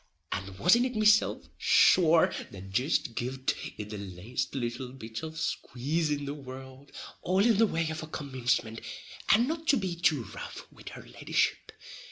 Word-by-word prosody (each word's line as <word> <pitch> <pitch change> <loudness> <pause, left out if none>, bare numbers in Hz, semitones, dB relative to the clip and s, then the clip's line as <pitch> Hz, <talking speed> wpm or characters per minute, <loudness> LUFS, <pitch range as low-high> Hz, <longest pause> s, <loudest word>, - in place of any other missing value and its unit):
And 95 0 -4
wasn't 235 - +4
it 250 - -7
mesilf, 215 0 +3
sure, 165 -2 +5 0.2
that 95 0 -10
jist 125 +2 0
giv'd 130 +3 -2 0.2
it 105 0 -6
the 105 - -5
laste 100 +7 -4
little 120 0 -3
bit 110 -3 -7
of 160 0 -6
a - - -9
squaze 155 +1 -1
in 145 -1 -1
the 140 - -3
world, 130 0 -10 0.3
all 190 +3 +2
in 230 -4 +4
the 225 - +6
way 165 -4 -1
of 160 - -5
a 155 - -7
commincement, 125 -6 -2 0.5
and 235 +4 +5
not 320 +1 -4
to 280 - +5
be 190 -5 -2
too 160 -7 +2
rough - - -8
wid - - -11
her - - -10
leddyship? - - -1
140 Hz, 175 wpm, -29 LUFS, 120-175 Hz, 0.5 s, the